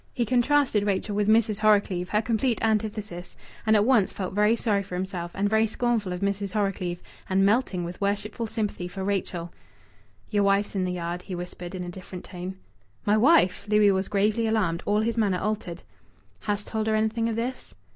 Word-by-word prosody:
He 240 - +1
contrasted 250 -2 +2
Rachel 200 +1 -1
with 205 0 +1
Mrs. 215 -2 +3
Horrocleave, 200 -4 +2
her 210 +1 +1
complete 230 +1 +1
antithesis, 215 -5 -2 0.3
and 220 - +5
at 210 0 +4
once 235 -6 +4
felt 185 -2 -5
very 210 +3 +3
sorry 210 -4 +1
for 190 -2 -7
himself 180 -2 -3
and 200 +1 +1
very 220 +1 +3
scornful 225 -3 -1
of 180 +1 -4
Mrs. 200 0 -1
Horrocleave, 195 -4 -1 0.3
and 195 +1 +3
melting 205 -4 +1
with 175 +3 -7
worshipful 205 +3 -1
sympathy 210 -5 -3
for 190 +2 -6
Rachel. 185 -3 -2 0.8
"Yer 205 -1 +2
wife's 200 +1 +2
in 190 -2 0
the 180 - -2
yard," 175 0 -3
he 185 0 -6
whispered 175 +1 -7
in 180 - -4
a 175 - -6
different 185 0 -9
tone. 180 +1 -6 0.5
"My 210 - +4
wife!" 235 - +4
Louis 210 -1 +5
was 190 0 0
gravely 210 +3 +1
alarmed; 190 -6 +1
all 210 +1 +3
his 230 +1 -1
manner 200 -5 +2
altered. 190 -4 -3 0.6
"Hast 205 -1 -2
told 220 -1 -2
her 220 - +2
anything 220 +1 +1
of 225 - -2
this?" 245 +3 -4
205 Hz, 190 wpm, -26 LUFS, 185-220 Hz, 0.8 s, and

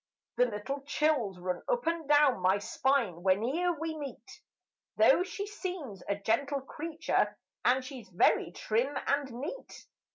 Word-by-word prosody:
The 250 - +5
little 235 +6 -4
chills 280 -8 0
run 180 0 -3
up 485 -1 +1
and 330 -3 -1
down 290 -6 +5
my 185 +2 +3
spine 230 -4 0
when'er 245 - +2
we 320 0 -3
meet, 285 -3 -9 0.6
Though - - +6
she 395 +2 -3
seems 360 - -6
a 200 - +2
gentle 275 +8 0
creature 315 +4 -1 0.3
and 255 +1 +3
she's 255 -5 -9
very 175 -1 +3
trim 235 +9 -1
and 280 -2 0
neat. 290 - -7
275 Hz, 140 wpm, -31 LUFS, 215-315 Hz, 0.6 s, Though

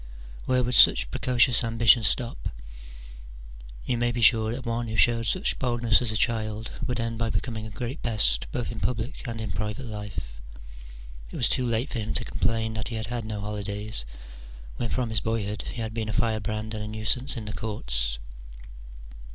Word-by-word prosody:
Where 125 -1 +2
would 125 +1 -1
such 110 - +7
precocious 120 -2 +3
ambition 115 +1 +5
stop? 120 +1 +1 1.4
You 120 -2 -1
may 120 0 +1
be 120 - -3
sure 110 0 +5
that 125 +2 -5
one 115 0 -2
who 110 - -5
showed 115 0 +3
such 185 - 0
boldness 120 -2 +2
as 120 -3 +1
a 110 - 0
child 110 -1 -1
i?v^ould 125 -2 -2
end 115 0 -3
by 115 -1 0
becoming 110 -2 -3
a - - -8
great 120 +6 -5
pest 105 - +3
both 120 - -3
in 115 - -6
public 120 +5 -2
and 115 -1 -4
in 110 -2 -4
private 105 +6 -4
life: 105 - -7 0.9
it - - -10
was 120 - +3
too 130 0 +2
late 115 +4 0
for 120 - -2
him 110 0 -3
to 120 - +1
complain 110 +1 -1
that 110 -1 -3
he 120 - -5
had 110 0 -3
had 120 -2 -3
no 105 -2 -4
holidays, 105 - -4 0.7
when 120 - -2
from 120 -1 -1
his 110 -4 0
boyhood 105 -2 -2
he 120 - -5
had 110 0 -5
been 110 -1 -3
a - - -2
firebrand 110 -1 -1
and 105 -1 -4
a - - -5
nuisance 110 +5 +1
in 110 - -5
the 105 - -6
courts. - - -1
110 Hz, 190 wpm, -26 LUFS, 105-120 Hz, 1.4 s, such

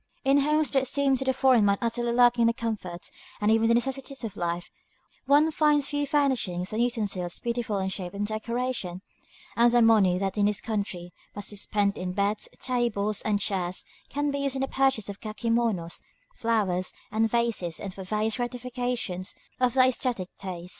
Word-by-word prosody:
In 275 +1 +5
homes 300 +2 +2
that 270 -1 +2
seem 275 +1 +2
to 270 - -2
the 265 - +2
foreign 260 -3 +4
mind 200 0 +3
utterly 235 0 -1
lacking 240 0 +4
in 230 - +5
the 230 - +3
comforts 215 -7 -5 0.3
and 210 +1 +2
even 225 0 +4
the 230 - +4
necessities 270 +2 -2
of 215 -3 -5
life, 175 -1 -3 0.6
one 295 +3 +5
finds 300 -2 +3
the - - -5
few 290 0 0
furnishings 245 -11 0
and 220 - 0
utensils 205 -7 -1
beautiful 235 -3 -2
in 190 -1 -1
shape 185 -1 -5
and 205 +1 -1
decoration; 220 -4 -3 0.5
and 235 +1 +5
the 240 - +4
money 205 -5 +5
that 195 +2 -2
in 205 - +4
this 210 0 0
country 200 -6 -4 0.2
must 205 0 -6
be - - -8
spent 200 0 0
in 180 0 -3
beds, 200 +2 -1
tables, 215 -5 0
and 210 -1 0
chairs 185 -3 -1 0.2
can 290 0 -1
be 280 - -2
used 280 -1 0
for - - -2
the 270 - 0
purchase 270 -6 +1
of 200 -1 -7
kakémonos, 220 -5 -1 0.3
flowers, 205 - 0 0.2
and 220 +1 +2
vases, 225 -8 0
and 195 -2 -6
for 190 - -8
various 215 +4 -1
gratifications 245 -6 -3 0.2
of 250 -1 +2
the 260 - +6
æsthetic 250 -7 +1
taste. 180 -2 -7
225 Hz, 190 wpm, -27 LUFS, 195-250 Hz, 0.6 s, the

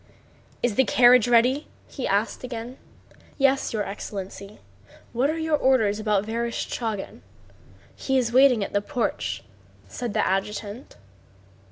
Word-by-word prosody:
"Is 240 -3 +2
the 265 - +6
carriage 245 -1 +5
ready?" 245 +4 +3 0.2
he 265 - -5
asked 205 +6 -1
again. 245 +1 -6 0.6
"Yes, 275 -1 +2
your 215 -2 -1
excellency. 200 0 -7 0.6
What 255 +4 +1
are 315 - -1
your 320 -1 +1
orders 240 -7 +2
about 210 -2 0
Vereshchágin? 230 -2 -4 0.7
He 265 -1 -1
is 235 -2 0
waiting 255 -4 +5
at - - -6
the 205 - +2
porch," 115 - -3 0.4
said 235 - -5
the - - +2
adjutant. 205 +4 -3
230 Hz, 130 wpm, -24 LUFS, 205-255 Hz, 0.7 s, the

